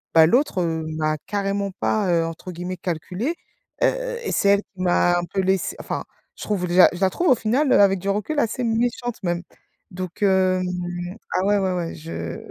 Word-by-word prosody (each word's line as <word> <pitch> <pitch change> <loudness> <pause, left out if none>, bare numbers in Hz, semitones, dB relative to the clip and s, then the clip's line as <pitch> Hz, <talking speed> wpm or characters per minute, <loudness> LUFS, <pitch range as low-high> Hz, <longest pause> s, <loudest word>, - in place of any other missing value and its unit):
bah, 160 -1 +8
l'autre, 225 - +2
heu, 160 -2 -1
m'a 155 0 0
carrément 200 -1 -1
pas, 205 -4 +1
heu, 170 -1 +2
entre 165 +3 -7
guillemets 180 +2 -5
«calculé», 180 - -3 0.5
heu, - - 0
et - - -2
c'est 200 - +2
elle 200 0 +5
qui 185 -2 -12
m'a 175 -1 +3
un 175 - -3
peu 195 - +1
laissé 190 0 0
enfin - - -4 0.3
je - - -9
trouve 190 -4 -1
déjà 180 +1 +7
je 175 - -8
la 190 - +4
trouve 350 - -1
au 255 - +7
final 255 +7 +1
avec 195 -1 +5
du 195 - -7
recul 210 +10 -1
assez 235 0 0
méchante 235 +1 -1
même. 175 0 -1 0.5
Donc 185 +1 -7
hem, 185 -1 +3 0.7
ah 185 - +1
ouais, 205 0 +3
ouais, 190 -1 0
ouais, 170 -2 -3
je 85 - -6
190 Hz, 195 wpm, -23 LUFS, 175-210 Hz, 0.7 s, bah